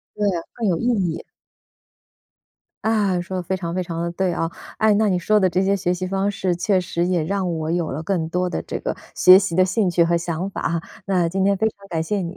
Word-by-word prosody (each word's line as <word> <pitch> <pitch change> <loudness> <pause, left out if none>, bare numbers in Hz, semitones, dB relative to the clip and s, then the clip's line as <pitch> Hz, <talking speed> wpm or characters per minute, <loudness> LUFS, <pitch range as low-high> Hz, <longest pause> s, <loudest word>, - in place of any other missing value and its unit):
对， 210 - 0 0.3
更 230 -3 -1
有 175 - +2
意 - - -4 0.3
义。 - - -7 1.6
啊， 205 -5 +2
说 185 +2 -5
得 - - -2
非 190 +2 -2
常 170 -2 -4
非 185 - 0
常 170 -2 -4
地 170 - -2
对 185 0 0
啊。 165 -1 -1 0.3
哎， 220 -1 +4
那 215 +1 +3
你 185 -2 +1
说 210 +4 +2
的 190 - +4
这 185 +2 +1
些 195 +1 +2
学 180 -2 0
习 180 +1 -3
方 195 +2 0
式 190 -3 -1
确 185 +2 +1
实 175 -1 -2
也 180 -3 +1
让 190 0 -1
我 160 0 -3
有 170 -1 -1
了 150 +4 -4
更 165 -2 -1
多 180 +2 0
的 - - -3
这 - - -5
个 - - -3 0.2
学 185 +1 +8
习 190 -4 -2
的 185 - +5
兴 190 0 +1
趣 170 0 +3
和 170 +1 +2
想 170 +2 -2
法 - - -5
哈， 170 0 0 0.3
那 180 -3 +2
今 190 +3 0
天 200 0 +3
非 220 - +1
常 200 -2 -14
感 165 -3 -1
谢 205 +5 -1
你， 175 -1 -5
185 Hz, 265 characters per minute, -22 LUFS, 170-195 Hz, 1.6 s, 学